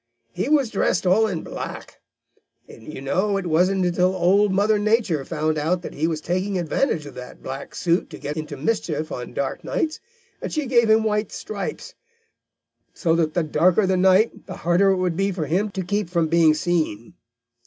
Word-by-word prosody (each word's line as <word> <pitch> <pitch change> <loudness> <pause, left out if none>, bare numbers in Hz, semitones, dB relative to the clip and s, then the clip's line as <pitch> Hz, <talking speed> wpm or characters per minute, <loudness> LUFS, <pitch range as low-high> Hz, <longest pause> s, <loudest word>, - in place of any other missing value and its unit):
He 260 - -2
was 280 -6 +3
dressed 190 -2 0
all 205 +5 +4
in 180 -6 -4
black. - - -7 0.7
You 130 +5 -10
know 190 +9 0
it 195 - -4
wasn't 180 +3 +2
until 180 +1 +1
Old 190 +3 +3
Mother 205 +2 +2
Nature 210 - +1
found 155 0 -1
out 170 +4 0
that - - -7
he 155 +3 0
was 160 -2 -2
taking 185 +4 -1
advantage 170 - 0
of 145 - -9
that 125 0 -10
black 135 +1 -7
suit 170 +1 0
to - - -9
get 145 +1 -5
into 155 -2 -5
mischief 155 -3 -2
on 125 0 -6
dark 140 -1 -3
nights 315 -1 -2 0.4
that - - -5
she 305 -2 -1
gave 235 -3 +3
him 220 0 +5
white 210 -1 0
stripes, 200 -2 -6 1.0
so 165 -2 +1
that 160 -2 0
the 175 - +2
darker 170 +6 +3
the 190 0 +1
night, 190 +4 +3
the - - -6
harder 175 +3 +2
it 190 - +3
would 180 -2 0
be 195 +3 0
for 175 -5 -3
him 190 +7 0
to 190 -1 -4
keep 200 0 -2
from 170 -2 +1
being 165 -2 +4
seen. 155 -10 -1
180 Hz, 190 wpm, -23 LUFS, 155-200 Hz, 1.0 s, him